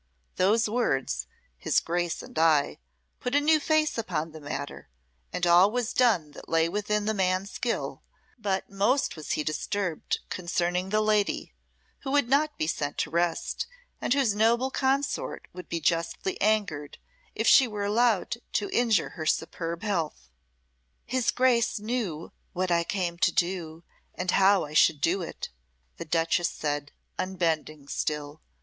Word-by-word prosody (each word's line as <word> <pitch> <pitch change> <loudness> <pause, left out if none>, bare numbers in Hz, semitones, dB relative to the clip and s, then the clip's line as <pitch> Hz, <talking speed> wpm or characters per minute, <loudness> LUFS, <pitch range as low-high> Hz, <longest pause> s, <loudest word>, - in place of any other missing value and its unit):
Those 215 +5 +3
words 135 - 0 0.3
"his - - +2
Grace 175 0 -2
and - - -6
I" 155 -3 +3 0.4
put 250 +2 -2
a - - +6
new 310 +1 +4
face 310 -3 +1
upon 165 -7 -2
the 155 0 -11
matter, 145 - -6 0.4
and 180 - -1
all 175 +3 +6
was 245 0 -2
done 205 -12 +3
that - - -12
lay 165 0 +3
within 210 +3 -1
the 220 - +1
man's 190 0 0
skill; 240 - -3 0.4
but 195 -3 -1
most 210 +8 +1
was 155 -2 -4
he 150 - -1
disturbed 175 +2 -2
concerning 180 +1 -1
the 215 +1 +2
lady, 215 -1 +1 0.5
who 270 - -6
would 285 -2 +2
not 295 +4 +2
be - - 0
sent 145 -2 -2
to 155 - -1
rest, 170 - -1 0.3
and - - -2
whose 265 -7 +2
noble 235 +5 +2
consort 270 +1 -1
would 180 -1 -9
be 170 - -2
justly 165 +4 0
angered 195 -9 0 0.4
if - - -1
she 265 - +7
were 210 -2 -3
allowed 225 0 +2 0.2
to 205 - -1
injure 230 -7 +2
her 155 -1 -6
superb 165 +2 -2
health. 165 - -2 0.8
"His 255 -2 0
Grace 245 -3 +2
knew 210 -8 -3 0.2
what 185 0 -1
I 170 0 +3
came 175 -1 -2
to - - +4
do 170 -2 -2 0.3
and 180 0 -1
how 195 -2 +4
I 150 - -10
should 155 -1 +5
do 180 +6 +1
it," 170 - -6 0.5
the - - -6
duchess 165 +2 +1
said, 145 -1 -3 0.3
unbending 160 -5 -1
still. 150 +1 -3
185 Hz, 155 wpm, -27 LUFS, 165-225 Hz, 0.8 s, she